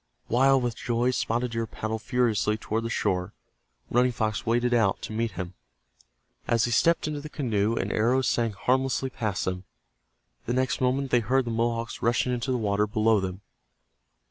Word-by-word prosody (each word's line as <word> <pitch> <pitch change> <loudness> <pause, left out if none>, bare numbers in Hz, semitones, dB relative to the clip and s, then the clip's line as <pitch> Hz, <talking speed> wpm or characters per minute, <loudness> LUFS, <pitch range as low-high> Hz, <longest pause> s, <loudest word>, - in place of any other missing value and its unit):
Wild 135 +2 +4
with 120 -2 -1
joy, 120 +1 0
Spotted 120 0 -1
Deer 115 0 -2
paddled 110 0 -4
furiously 110 -4 +1
toward 110 +1 -2
the 115 - -3
shore. 90 -5 -1 0.6
Running 125 +1 +3
Fox 110 -2 -2
waded 120 +1 +2
out 110 -5 +2
to - - -5
meet 115 +1 -1
him. 90 -1 -5 0.9
As 115 -1 +3
he 120 - -2
stepped 165 +7 +3
into 150 -1 -3
the 155 - -8
canoe, 115 -7 0
an - - -2
arrow 125 +5 +2
sang 115 -2 +1
harmlessly 130 +4 0
past 110 -5 -2
them. 90 0 -3 0.8
The 120 - 0
next 130 +1 0
moment 130 +1 +1
they 120 - +5
heard 125 +4 +1
the 115 - -3
Mohawks 115 0 -1
rushing 120 +2 +1
into 125 +2 -2
the 125 - +1
water 105 -2 +1
below 110 0 +3
them. 95 0 -4
115 Hz, 175 wpm, -27 LUFS, 110-125 Hz, 0.9 s, they